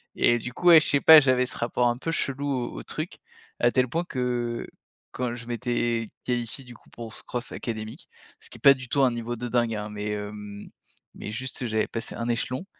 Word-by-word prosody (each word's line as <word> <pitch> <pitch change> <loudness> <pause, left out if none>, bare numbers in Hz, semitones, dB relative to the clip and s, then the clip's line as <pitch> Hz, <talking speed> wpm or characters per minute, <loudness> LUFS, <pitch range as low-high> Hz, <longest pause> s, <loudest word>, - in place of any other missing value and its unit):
Et 120 - +4
du 125 +2 -6
coup, 175 - -2
ouais, 165 -2 +10
je - - -2
sais 140 - +2
pas, 160 -1 +10
j'avais 130 -2 +3
ce - - -8
rapport 120 +1 +1
un 120 0 0
peu 165 +5 -3
chelou 140 -2 -2
au 130 -3 -1
au - - -8
truc, - - -5 0.4
à 120 0 +4
tel 130 -1 +2
point 165 +8 -1
que, 120 -4 -2 0.4
quand 125 -1 -2
je 115 -1 -9
m'étais 120 -2 -1 0.2
qualifié, 120 +2 -2
du 120 -1 -12
coup, - - -21
pour 115 -2 -8
ce - - -8
cross 120 -1 -5
académique 110 -2 -6 0.3
ce - - -13
qui - - -8
est - - -20
pas 140 - +10
du 125 -1 -9
tout 140 - +2
un 125 - +4
niveau 120 0 -4
de 120 +1 -5
dingue, 120 -1 +1
hein, 105 0 -4
mais, 105 0 -4
hem, 105 0 -6 0.5
mais 105 - -6
juste 130 +1 -4
j'avais 110 -1 0
passé 115 0 -5
1 120 0 -3
échelon. 125 +8 -2
120 Hz, 230 wpm, -26 LUFS, 115-130 Hz, 0.5 s, ouais